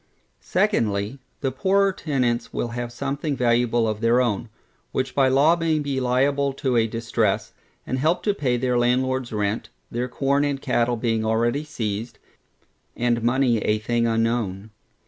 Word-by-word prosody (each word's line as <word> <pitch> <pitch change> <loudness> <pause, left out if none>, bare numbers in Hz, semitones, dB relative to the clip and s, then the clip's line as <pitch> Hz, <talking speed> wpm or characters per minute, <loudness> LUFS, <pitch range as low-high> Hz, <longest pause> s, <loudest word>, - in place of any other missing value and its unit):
Secondly, 105 +4 0 0.2
The 135 -2 0
poorer 195 +8 +2
tenants 125 -9 -1
will 120 - -2
have 120 0 -4
something 140 +4 -3
valuable 120 -1 +2
of 110 0 -3
their 115 +2 +4
own, 115 -3 0 0.4
which 130 0 -2
by 135 -2 +3
law 140 +6 +4
may 165 -2 0
be 140 -3 -1
made - - -3
liable 135 +2 +1
to 135 -2 -1
a 115 -1 +3
distress, 115 -2 -1 0.3
and 130 - -2
help 160 +6 +1
to 205 - +2
pay 130 -10 0
their 125 0 0
landlordŌĆÖs 125 -1 0
rent, 105 +2 -1 0.2
their 120 +2 -2
corn 140 +3 +1
and 140 -2 -1
cattle 120 -3 0
being 115 -1 0
already 120 +6 +1
seized, 110 -5 -4 0.8
and 120 -1 +1
money 120 0 +2
a 105 0 +1
thing 115 +2 0
unknown. 115 -3 -1
120 Hz, 160 wpm, -23 LUFS, 115-135 Hz, 0.8 s, their